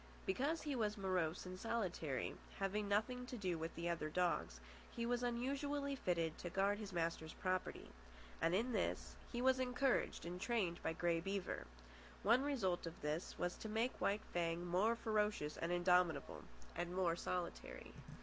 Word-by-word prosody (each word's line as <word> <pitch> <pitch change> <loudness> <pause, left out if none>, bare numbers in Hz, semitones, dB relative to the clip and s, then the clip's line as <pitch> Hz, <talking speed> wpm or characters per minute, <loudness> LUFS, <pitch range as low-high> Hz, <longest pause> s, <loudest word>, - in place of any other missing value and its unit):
Because 320 -2 +1
he 295 -2 -1
was 215 -3 +1
morose 185 -4 0
and 185 0 -6
solitary, 180 - -1 0.2
having 200 +1 0
nothing 250 +5 +1
to 250 - -5
do 180 -5 -1
with 165 +1 -4
the 170 +1 -2
other 170 -3 -1
dogs, 155 - +1 0.3
he 235 - -3
was 245 0 +1
unusually 280 +4 0
fitted 170 -9 0
to 175 - -3
guard 195 +3 +2
his 205 -2 -5
master's 165 -2 -1
property; 185 -1 -1 0.5
and 165 +2 +3
in 235 +6 +1
this - - -1 0.2
he 245 0 -1
was 260 0 +5
encouraged 255 -3 +1
and 180 +1 -4
trained 195 -8 +1
by 160 - 0
Grey 170 0 +2
Beaver. 195 +2 -2 0.6
One 235 +6 +6
result 210 -13 0
of 165 - -7
this 150 +3 -2
was 175 - 0
to 220 - -5
make 225 +4 0
White 205 +2 +2
Fang 170 0 0
more 190 +7 +3
ferocious 210 -9 +1
and 165 +1 -2
indomitable, 175 -1 +3 0.3
and 175 +1 -2
more 180 -3 +3
solitary. 175 0 -4
190 Hz, 165 wpm, -41 LUFS, 170-235 Hz, 0.6 s, One